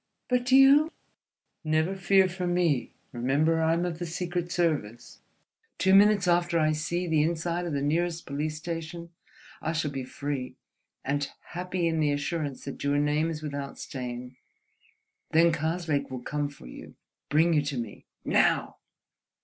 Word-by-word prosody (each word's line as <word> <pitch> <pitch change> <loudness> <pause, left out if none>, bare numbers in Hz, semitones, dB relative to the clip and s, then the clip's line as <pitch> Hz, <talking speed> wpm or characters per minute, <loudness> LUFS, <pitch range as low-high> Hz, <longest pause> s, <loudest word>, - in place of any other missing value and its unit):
"But 250 0 +1
you—?" 275 +4 +7 0.7
"Never 160 +4 +1
fear 190 0 +4
for 180 0 -4
me, 175 -7 +1 0.2
remember 140 +7 +1
that 160 - +1
I 160 - +3
am 170 +1 0
of 170 -2 -4
the 175 - -3
Secret 175 +1 -3
Service: 150 -11 -2 0.6
two 190 0 +3
minutes 200 -1 +6
after 175 0 +2
I 155 -1 +3
see 170 +4 -2
the 160 -3 +2
inside 170 +2 -1
of 165 - -3
the 140 -1 -1
nearest 170 +3 0
police 150 +2 -3
station, 165 +1 -6 0.5
I 160 - -1
shall 155 -3 -1
be 135 -2 -4
free—and 140 +1 -5 0.2
happy 180 0 -2
in 160 -1 0
the 150 -2 +2
assurance 145 -1 -3
that 140 - -6
your 140 0 +1
name 150 +2 +1
is 155 -1 -5
without 140 -2 -5
stain. 125 -1 -6 1.0
Then 165 +1 +5
Karslake 155 -3 -1
will 130 -2 -6
come 145 +1 -2
for 140 - -15
you, - - -11 0.3
bring 160 +3 +4
you 150 - +4
to 145 -2 -3
me... 115 -4 -6 0.2
Now!" - - +2
160 Hz, 155 wpm, -28 LUFS, 145-175 Hz, 1.0 s, you